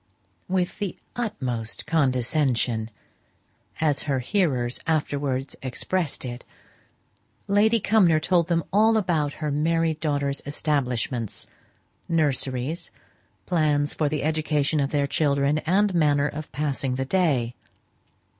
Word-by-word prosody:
"With 185 Hz, 0 st, -1 dB
the 200 Hz, -3 st, -3 dB, 0.2 s
utmost 130 Hz, -, -3 dB
condescension," 130 Hz, -6 st, +1 dB, 0.9 s
as 150 Hz, -3 st, +1 dB
her 135 Hz, -, +2 dB
hearers 130 Hz, -5 st, 0 dB
afterwards 140 Hz, -4 st, -1 dB
expressed 140 Hz, +4 st, -2 dB
it, 120 Hz, 0 st, -6 dB, 1.0 s
Lady 215 Hz, +3 st, +4 dB
Cumnor 190 Hz, -7 st, +4 dB
told 170 Hz, +1 st, +2 dB
them 170 Hz, -2 st, +1 dB
all 220 Hz, +2 st, +5 dB
about 160 Hz, -8 st, 0 dB
her 150 Hz, -2 st, -3 dB
married 160 Hz, +2 st, +1 dB
daughters' 140 Hz, -3 st, 0 dB
establishments, 125 Hz, -6 st, -1 dB, 0.6 s
nurseries, 145 Hz, -2 st, 0 dB, 0.5 s
plans 150 Hz, -4 st, +1 dB
for 150 Hz, -2 st, 0 dB
the 150 Hz, -1 st, -2 dB
education 155 Hz, -1 st, +1 dB
of 140 Hz, -1 st, +1 dB
their 145 Hz, -1 st, +1 dB
children, 140 Hz, 0 st, +1 dB
and 200 Hz, +3 st, +3 dB
manner 145 Hz, -4 st, +3 dB
of 150 Hz, +1 st, -7 dB
passing 135 Hz, -3 st, -1 dB
the 135 Hz, +1 st, -2 dB
day. 135 Hz, -8 st, +1 dB
150 Hz, 110 wpm, -25 LUFS, 135-165 Hz, 1.0 s, all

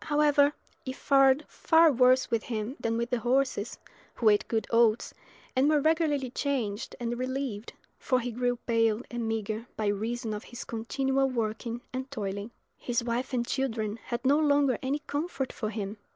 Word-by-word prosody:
However, 295 Hz, -1 st, +4 dB, 0.3 s
it 260 Hz, 0 st, -5 dB
fared 275 Hz, +1 st, +4 dB
far 325 Hz, -1 st, +4 dB
worse 255 Hz, 0 st, +4 dB
with 230 Hz, -2 st, +2 dB
him 225 Hz, +2 st, -3 dB
than 230 Hz, 0 st, -1 dB
with 235 Hz, +1 st, -2 dB
his 245 Hz, -, +1 dB
horses, 245 Hz, -2 st, 0 dB, 0.4 s
who 225 Hz, -, +4 dB
ate 205 Hz, -1 st, +3 dB
good 225 Hz, -1 st, 0 dB
oats, 230 Hz, -1 st, +3 dB, 0.4 s
and 265 Hz, +3 st, +4 dB
were 305 Hz, -1 st, +4 dB
regularly 295 Hz, -4 st, +1 dB
changed 245 Hz, -7 st, -2 dB
and 240 Hz, 0 st, -3 dB
relieved, 255 Hz, -4 st, -3 dB, 0.3 s
for 255 Hz, -2 st, +1 dB
he 245 Hz, 0 st, -3 dB
grew 245 Hz, +1 st, 0 dB
pale 225 Hz, -1 st, +2 dB
and 240 Hz, -1 st, -3 dB
meagre 225 Hz, +1 st, -3 dB
by 215 Hz, -, -1 dB
reason 220 Hz, +3 st, -1 dB
of 210 Hz, -, -6 dB
his 240 Hz, -, -8 dB
continual 270 Hz, +4 st, 0 dB
working 230 Hz, 0 st, -3 dB
and 260 Hz, +1 st, -4 dB
toiling. 205 Hz, -4 st, -4 dB, 0.3 s
His 240 Hz, -1 st, -1 dB
wife 240 Hz, +3 st, -2 dB
and 245 Hz, -2 st, 0 dB
children 225 Hz, -5 st, -2 dB
had 235 Hz, 0 st, -4 dB
no 285 Hz, +3 st, +5 dB
longer 285 Hz, -5 st, +3 dB
any 280 Hz, +3 st, -2 dB
comfort 285 Hz, -3 st, -3 dB
for 215 Hz, -, -3 dB
him. 210 Hz, -1 st, -4 dB
245 Hz, 170 wpm, -28 LUFS, 225-270 Hz, 0.4 s, no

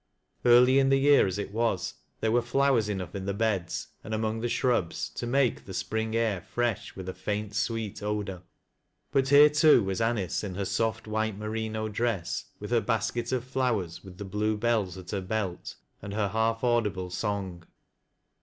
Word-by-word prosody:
Early 125 Hz, +2 st, +6 dB
in 135 Hz, 0 st, +3 dB
the 135 Hz, -, +5 dB
year 140 Hz, -4 st, +5 dB
as 95 Hz, +1 st, -3 dB
it 100 Hz, -1 st, -4 dB
was, 115 Hz, -4 st, 0 dB, 0.3 s
there 110 Hz, -, +1 dB
were 120 Hz, +1 st, +3 dB
flowera 130 Hz, -1 st, +2 dB
enough 95 Hz, -4 st, -4 dB
in 95 Hz, -1 st, -5 dB
the 100 Hz, -, -1 dB
beds, 100 Hz, -5 st, -1 dB
and 110 Hz, -, -3 dB
among 110 Hz, 0 st, -1 dB
the 120 Hz, +1 st, -2 dB
shrubs, 120 Hz, -11 st, 0 dB
to 120 Hz, -, -5 dB
make 130 Hz, 0 st, +1 dB
the 95 Hz, -, -6 dB
spring 110 Hz, +4 st, -2 dB
air 110 Hz, -5 st, +1 dB
fresh 120 Hz, +2 st, -2 dB
with 95 Hz, -1 st, -7 dB
a 95 Hz, -, -3 dB
faint, 105 Hz, 0 st, -3 dB
sweet 105 Hz, 0 st, -2 dB
odor. 105 Hz, -3 st, -3 dB, 0.7 s
But 135 Hz, -1 st, +2 dB
here 145 Hz, +1 st, +9 dB
too 150 Hz, -5 st, +6 dB
was 95 Hz, +2 st, -2 dB
Anice 115 Hz, -6 st, 0 dB
in 95 Hz, -3 st, -4 dB
her 100 Hz, 0 st, -2 dB
soft 110 Hz, +2 st, -1 dB
white 110 Hz, -1 st, -1 dB
merino 110 Hz, 0 st, -3 dB
dress, 110 Hz, -4 st, -2 dB
with 105 Hz, +2 st, -7 dB
her 120 Hz, -2 st, +3 dB
basket 115 Hz, +2 st, -1 dB
of 130 Hz, -2 st, 0 dB
flowers, 125 Hz, -10 st, -1 dB
with 95 Hz, -2 st, -12 dB
the 100 Hz, -, -6 dB
blue 105 Hz, +2 st, -1 dB
bells 105 Hz, -5 st, 0 dB
at 90 Hz, -1 st, -9 dB
her 100 Hz, -, -2 dB
belt, 95 Hz, -2 st, -3 dB, 0.3 s
and 100 Hz, 0 st, -6 dB
her 105 Hz, -2 st, 0 dB
hali 110 Hz, +2 st, +1 dB
audible 105 Hz, -7 st, 0 dB
song. 95 Hz, -4 st, -3 dB
110 Hz, 185 wpm, -28 LUFS, 100-120 Hz, 0.7 s, here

